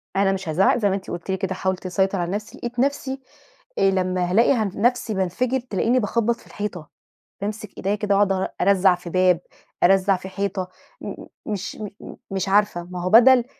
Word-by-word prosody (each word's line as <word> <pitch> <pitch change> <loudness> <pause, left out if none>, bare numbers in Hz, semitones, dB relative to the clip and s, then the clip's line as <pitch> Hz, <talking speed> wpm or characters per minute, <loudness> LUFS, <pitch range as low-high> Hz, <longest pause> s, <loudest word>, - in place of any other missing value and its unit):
أنا 195 0 +3
مش 195 -3 -4
هازعّق 185 +9 +3
زي 210 -4 +2
ما 190 - +1
أنتِ 195 - -7
قُلتِ 175 +2 -5
لي 190 - 0
كده، 190 -1 -2
حاولت 190 0 -2
أسيطر 190 +1 0
على 175 +1 -2
نَفسي 210 +2 -5
لقيت 240 0 -5
نَفسي 270 0 -1 0.6
آآ، 195 - +4
لما 185 -1 0
هالاقي 230 +7 +5
ه 230 -4 +1
نَفسي 240 0 +1
بانفَجر 215 +8 0
تلاقيني 245 +1 0
باخبّط 230 +2 +1
في - - -20
الحيطة، 185 -7 -6 0.5
بامسك 215 +1 -5
إيديّا 200 +2 0
كده 205 -1 0
أقعُد 200 -1 +3
أ 190 0 -1
أرزّع 190 -2 +4
في 180 0 -9
باب، 185 -1 +3 0.4
أرزّع 195 +2 +4
في 185 +1 -9
حيطة، 195 -1 -3 0.3
مم - - -5 0.3
مش 210 -2 -4 0.2
مم - - -10
مش 195 0 -2
عارفة، 205 -3 +2
ما 180 0 -7
هو 180 - 0
بدَل 245 +3 +7
195 Hz, 195 wpm, -23 LUFS, 185-215 Hz, 0.6 s, بدَل